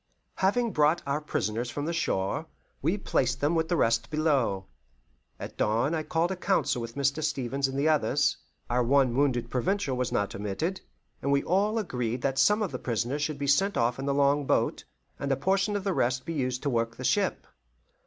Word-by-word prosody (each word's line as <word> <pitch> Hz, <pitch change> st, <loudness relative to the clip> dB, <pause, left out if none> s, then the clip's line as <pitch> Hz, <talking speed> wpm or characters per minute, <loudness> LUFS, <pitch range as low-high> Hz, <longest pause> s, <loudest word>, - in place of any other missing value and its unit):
Having 230 Hz, +5 st, +2 dB
brought 150 Hz, +1 st, +2 dB
our 140 Hz, +2 st, -1 dB
prisoners 115 Hz, -4 st, -2 dB
from 145 Hz, +3 st, -4 dB
the 170 Hz, -, -2 dB
shore, 150 Hz, -, -1 dB, 0.3 s
we 165 Hz, +8 st, +1 dB
placed 130 Hz, -9 st, 0 dB
them 145 Hz, +3 st, +1 dB
with 160 Hz, -1 st, +1 dB
the 175 Hz, -, +2 dB
rest 115 Hz, -3 st, +2 dB
below. 140 Hz, -11 st, +1 dB, 0.7 s
At -, -, -8 dB
dawn 115 Hz, +8 st, +1 dB
I 160 Hz, -, 0 dB
called 165 Hz, +2 st, 0 dB
a -, -, -1 dB
council 145 Hz, -9 st, 0 dB
with 115 Hz, +1 st, -7 dB
Mr. 140 Hz, +2 st, 0 dB
Stevens 135 Hz, -2 st, -1 dB
and 135 Hz, 0 st, -5 dB
the 140 Hz, +3 st, +2 dB
others 145 Hz, -1 st, +2 dB, 0.3 s
our 125 Hz, +1 st, +1 dB
one 130 Hz, -1 st, +3 dB
wounded 130 Hz, -3 st, +1 dB
Provincial 145 Hz, +1 st, 0 dB
was 125 Hz, 0 st, -1 dB
not 100 Hz, -1 st, 0 dB
omitted 105 Hz, -, -3 dB, 0.4 s
and 140 Hz, -, 0 dB
we 140 Hz, 0 st, +3 dB
all 205 Hz, +5 st, +1 dB
agreed 125 Hz, -, -2 dB
that 135 Hz, -1 st, 0 dB
some 210 Hz, +11 st, +4 dB
of 195 Hz, -, -3 dB
the -, -, -4 dB
prisoners 120 Hz, +4 st, -2 dB
should 150 Hz, 0 st, -1 dB
be 140 Hz, -, -3 dB
sent 195 Hz, +9 st, +2 dB
off 120 Hz, +2 st, +1 dB
in 135 Hz, -, -3 dB
the -, -, +2 dB
long 140 Hz, 0 st, +2 dB
boat, -, -, +1 dB, 0.4 s
and 140 Hz, -, -2 dB
a 135 Hz, -, +2 dB
portion 195 Hz, +6 st, +1 dB
of 200 Hz, -, -2 dB
the 195 Hz, -1 st, 0 dB
rest 130 Hz, -3 st, 0 dB
be 165 Hz, -, -3 dB
used 130 Hz, -3 st, -2 dB
to 145 Hz, -, 0 dB
work 115 Hz, -1 st, -1 dB
the -, -, -8 dB
ship. -, -, +1 dB
140 Hz, 205 wpm, -28 LUFS, 125-165 Hz, 0.7 s, some